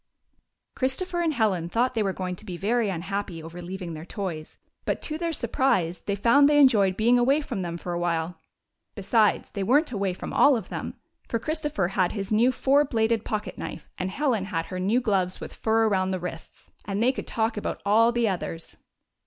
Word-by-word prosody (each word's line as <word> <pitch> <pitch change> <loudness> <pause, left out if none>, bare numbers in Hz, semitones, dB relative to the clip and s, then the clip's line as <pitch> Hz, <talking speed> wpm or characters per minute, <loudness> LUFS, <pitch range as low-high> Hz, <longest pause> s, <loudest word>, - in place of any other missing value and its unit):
Christopher 345 +7 -1
and 330 -2 +1
Helen 190 -8 +1
thought 245 +6 +1
they 225 - 0
were 195 -2 +1
going 185 -1 -4
to - - -12
be 185 -5 -6
very 220 +3 +1
unhappy 190 -1 -4
over 170 +2 -8
leaving 180 -1 -6
their 155 0 -7
toys, 175 -4 -6 0.3
but - - -1
to 310 - -1
their 340 -1 -1
supprise 225 - 0
they 200 - -2
found 280 +8 +5
they 295 - +4
enjoyed 210 -10 +5
being 240 +3 +4
away 270 +5 +3
from 250 -9 -4
them 170 -1 -4
for 175 +1 -5
awhile. 170 -1 -1 0.6
Besides, 210 +1 +2
they 200 - -4
were 250 +9 +5
n't 315 - -9
away 195 -5 -1
from - - -7
all 280 -3 +5
of 225 - -7
them, - - -5 0.3
for 230 - -1
Christopher 295 - -2
had 185 -2 +1
his 200 -1 -4
new 230 +4 +4
four 275 +3 +3
bladed 225 -4 0
pocket 215 -1 -4
knife 165 - -7
and 185 - -1
Helen 235 -3 0
had 165 -5 -2
her 185 - -5
new 210 +7 +2
gloves 190 -5 0
with - - -8
fur 225 0 +2
around 190 -3 +1
the 185 -1 -1
wrists, 170 -2 -8
and 200 +2 -1
they 250 - +4
could 270 - -7
talk 225 0 0
about 210 - -3
all 225 +3 +5
the 240 -1 +1
others. 170 -4 -4
205 Hz, 205 wpm, -26 LUFS, 185-240 Hz, 0.6 s, found